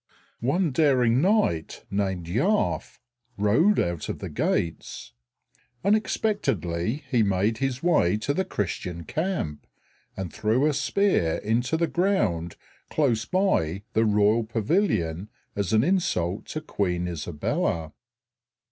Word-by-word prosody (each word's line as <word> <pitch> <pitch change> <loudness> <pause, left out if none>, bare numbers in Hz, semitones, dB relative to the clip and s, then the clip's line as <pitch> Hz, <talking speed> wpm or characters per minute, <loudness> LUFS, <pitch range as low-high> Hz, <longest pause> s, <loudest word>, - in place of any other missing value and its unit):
One 155 +7 +1
daring 130 -4 +3
knight 185 - +1
named 95 -3 -1
Yarfe 145 - 0 0.4
rode 145 - +3
out 85 -3 -2
of - - -3
the - - -7
gates; 80 -2 -2 0.7
unexpectedly 150 - 0
he 120 -4 +3
made 105 +2 +1
his 135 0 -2
way 130 - +3
to 140 +6 -1
the 190 - 0
Christian 85 - -4
camp, 160 - -3 0.5
and 95 -3 -5
threw 115 +6 +1
a 155 - +2
spear 145 - +1
into 120 +8 0
the 170 - +2
ground 110 - 0 0.3
close 120 -7 +1
by 105 - +1
the 110 - +3
royal 105 +1 +3
pavilion 110 - 0 0.3
as 100 -3 -1
an 110 0 +4
insult 115 - 0
to 155 - -4
Queen 90 - -1
Isabella. 80 -1 -2
110 Hz, 120 wpm, -26 LUFS, -, 0.7 s, an